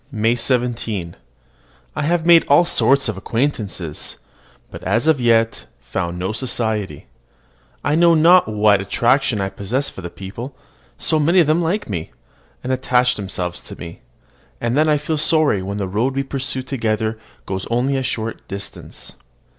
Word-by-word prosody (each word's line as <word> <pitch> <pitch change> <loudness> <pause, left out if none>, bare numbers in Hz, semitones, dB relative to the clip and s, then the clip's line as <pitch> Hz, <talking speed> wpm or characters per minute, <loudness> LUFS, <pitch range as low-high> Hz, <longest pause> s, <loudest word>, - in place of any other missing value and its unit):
MAY 115 -1 +2
17. 115 -7 -2 0.8
I - - -2
have 165 +2 0
made 170 -1 +7
all 145 +5 +5
sorts 140 -5 +3
of 110 -3 -3
acquaintances, 100 - -3 0.5
but - - -9
have 120 +7 +1
as 160 -4 +4
yet 115 -1 +2
found 85 0 -4
no 95 +3 -2
society. 110 -4 -2 0.8
I 145 - +1
know 170 +1 +5
not 170 +3 +6
what 105 -2 +3
attraction 120 +3 +1
I 95 0 -1
possess 120 +9 -2
for - - -9
the 85 - -6
people, 115 +10 -8 0.4
so 155 - +1
many 170 +5 +4
of 170 - +5
them 155 +3 +2
like 180 +6 -1
me, 85 -6 -4 0.5
and 130 - -1
attach 125 -1 +2
themselves 95 -4 -4
to - - -11
me; 85 -1 -9 0.6
and 120 +1 -1
then 155 +2 +3
I 150 - +4
feel 150 +1 -2
sorry 155 - +3
when 100 +2 -4
the 100 -2 -2
road 115 +8 -1
we 135 - 0
pursue 135 -1 -3
together 110 -4 -2 0.3
goes 95 0 -4
only 125 +4 +1
a 135 - 0
short 115 -3 -4
distance. 100 0 -8
120 Hz, 160 wpm, -20 LUFS, 100-145 Hz, 0.8 s, made